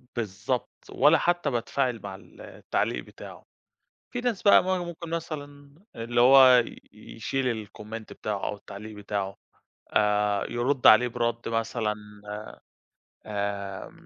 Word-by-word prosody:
بالضبط، 110 +3 -2 0.2
ولا - - +5
حتى 175 -4 +1
باتفاعل 120 0 -1
مع 95 -1 -6
ال 95 - -16
التعليق - - -2
بتاعه. - - -12 0.7
في 245 - -3
ناس 240 -5 -1
بقى 200 - +7
ما 185 0 +1
ممكن 170 -1 -7
مثلًا 145 -4 -6 0.2
اللي 120 +1 0
هو 130 -1 +8 0.3
يشيل 115 +1 -3
الcomment 110 +2 -8
بتاعه 105 -2 -4
أو - - -2
التعليق 105 +1 -10
بتاعه، 100 -1 -3 0.6
آآ، 105 -1 +2
يرد 125 +3 +2
عليه 120 +3 +8
بِرَد 115 -1 -2
مثلًا 115 -1 -1 0.3
آآ، 105 +1 -6 0.8
آآ، 100 -2 -4
115 Hz, 125 wpm, -27 LUFS, 105-135 Hz, 0.8 s, هو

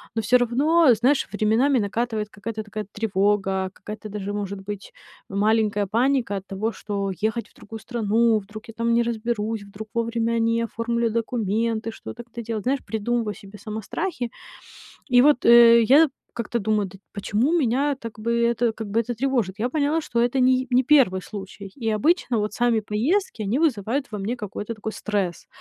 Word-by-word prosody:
Но 225 - +1
всё 245 +4 +4
равно, 270 +5 +4
знаешь, 255 +6 +2
временами 225 +6 +2
накатывает 220 +1 -1
какая-то 215 +1 -6
такая 210 0 -6
тревога, 195 -2 0
какая-то 215 +2 -8
даже, 205 -1 -4
может 200 -1 -4
быть, 200 0 -7 0.4
маленькая 210 0 +1
паника 235 -1 +1
от 190 - -8
того, 210 +3 -2
что 200 -3 -3
ехать 220 +2 -1
в - - -30
другую 225 +1 -10
страну, 225 0 +1
вдруг 210 +2 -10
я 225 - -9
там 230 +1 0
не 235 0 +3
разберусь, 225 -2 -2
вдруг 200 +2 -9
вовремя 230 0 0
не 230 0 +1
оформлю 235 0 -1
документы, 225 0 -1
что-то 235 +1 -9
как-то 235 0 -9
делать. 220 -2 -4
Знаешь, 270 +2 +1
придумываю 225 0 -1
себе 200 0 -12
сама 220 -2 -5
страхи. 250 - -3 0.9
И 245 - +8
вот, 290 -2 +4
э, 235 0 +8
я 285 +8 +6 0.3
как-то 235 0 -2
думаю: 215 -1 0
"Да 195 +1 -14
почему 215 +7 0
меня 280 +1 +1
так 230 -3 -9
бы 230 +2 -1
это 235 0 +1
как 220 - -6
бы 225 +3 +2
это 240 +1 -3
тревожит?" 235 -6 -1
Я 235 +3 0
поняла, 305 +2 +1
что 235 -5 -1
это 245 +3 +1
не 255 0 +5
й 260 - -11
не 250 +1 +4
1 240 -10 +4
случай, 200 0 -8 0.2
и - - +1
обычно 285 - +2
вот 210 0 -1
сами 235 0 +2
поездки- 230 - -1
они 210 +7 0
вызывают 265 -3 0
во 210 - -3
мне 210 +5 -2
какой-то 210 0 -5
такой 220 0 -5
стресс. 200 -6 -3
225 Hz, 180 wpm, -24 LUFS, 210-240 Hz, 0.9 s, И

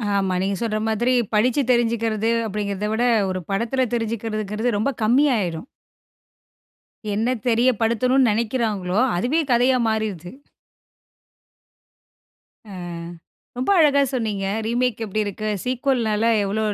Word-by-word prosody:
ஆமா, 195 -2 0
நீங்க 195 +1 -1
சொல்ற 215 -2 -1
மாதிரி 235 +3 +1 0.2
படிச்சு 240 +6 +2
தெரிஞ்சுக்கிறது 230 -2 +1 0.2
அப்படிங்கிறதை 205 0 -3
விட, 230 +3 +1 0.2
ஒரு 185 0 -2
படத்தில 235 +6 0
தெரிஞ்சுக்கிறதுங்கிறது 225 -1 -2
ரொம்ப 220 +7 0
கம்மி 250 +7 +4
ஆயிரும். 175 0 -3 1.5
என்ன 225 +5 0
தெரியப்படுத்தணும்னு 245 +2 +2
நெனைக்கிறாங்களோ, 215 -4 -1 0.2
அதுவே 265 - +1
கதையா 250 +2 +4
மாறிருது! 215 -6 -2 2.4
அ - - -14 0.9
ரொம்ப 255 - 0
அழகா 285 -2 +4
சொன்னீங்க. 210 -5 -2 0.2
ரீமேக் 240 0 0
எப்படி 215 0 -2
இருக்கு? 210 +1 -4 0.2
சீக்குவல்னால 245 -4 0 0.2
எவ்ளோ, 210 +2 -1
225 Hz, 105 wpm, -22 LUFS, 210-245 Hz, 2.4 s, கம்மி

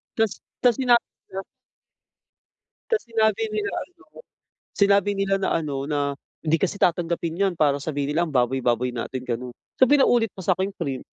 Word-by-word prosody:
tapos 220 -3 0 0.2
tapos 245 -2 +4
sinabi 245 -2 +3 0.2
nila 190 - -4 1.5
tapos 450 -2 +1
sinabi 220 -2 +1
nila 210 -1 -1
ano, 360 0 -24 0.7
sinabi 200 0 +4
nila 195 0 +1
na 190 - 0
ano, 150 -4 -2
na 145 -1 0 0.4
"Hindi 160 +1 +3
kasi 195 +1 0
tatanggapin 170 -2 0
iyan 195 -2 +2
para 145 -2 +2
sabihin 145 -1 -2
nila, 170 - +2
ang 160 - -6
baboy-baboy 125 -1 +1
natin." 125 +2 -4
ganoon. 125 +1 -3 0.3
So, 260 - +7
pinaulit 245 -6 +4
pa 190 - -9
sa 185 - +4
akin 190 +2 -2
iyong - - -20
print. 135 -2 -3
180 Hz, 165 wpm, -24 LUFS, 140-215 Hz, 1.5 s, So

